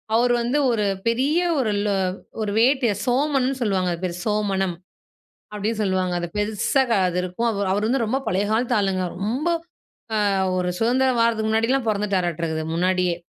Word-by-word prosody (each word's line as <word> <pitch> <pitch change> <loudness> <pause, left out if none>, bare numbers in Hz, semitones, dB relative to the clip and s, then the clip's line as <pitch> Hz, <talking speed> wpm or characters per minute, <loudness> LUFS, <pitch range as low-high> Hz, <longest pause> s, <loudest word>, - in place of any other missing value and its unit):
அவரு 240 +1 +3
வந்து 245 +5 0
ஒரு 220 -2 0 0.2
பெரிய 265 +8 +2 0.2
ஒரு 225 -5 +1
ல 210 - +1 0.5
ஒரு 210 -1 -1
வேட்டிய 250 0 +3
சோமனு 270 +1 +1
சொல்லுவாங்க 190 -5 +1
அது 170 - -7
பேர். 175 -1 -2
சோமனம், 195 -4 0 0.8
அப்டின்னு 210 +2 -2
சொல்லுவாங்க. 185 -2 0
அது 175 - -3
பெருசா, 215 +6 +1 0.2
அது 180 0 -2
இருக்கும். 185 +6 -2
அவரு 200 -2 -2
அவரு 205 +2 0
வந்து 250 -1 +1
ரொம்ப 260 +5 0
பழைய 195 -1 +1
காலத்து 240 +2 +1
ஆளுங்க. 190 -2 0
ரொம்ப 235 - -2 0.8
ஆ - - +2 0.3
ஒரு 180 0 0
சுதந்திரம் 250 +2 +2
வாரதுக்கு 225 -2 +2
முன்னாடிலாம் 230 +3 +1
பொறந்துட்டாராட்டுருக்குது, 175 -6 -1
முன்னாடியே. 180 0 +1
215 Hz, 155 wpm, -23 LUFS, 185-245 Hz, 0.8 s, அவரு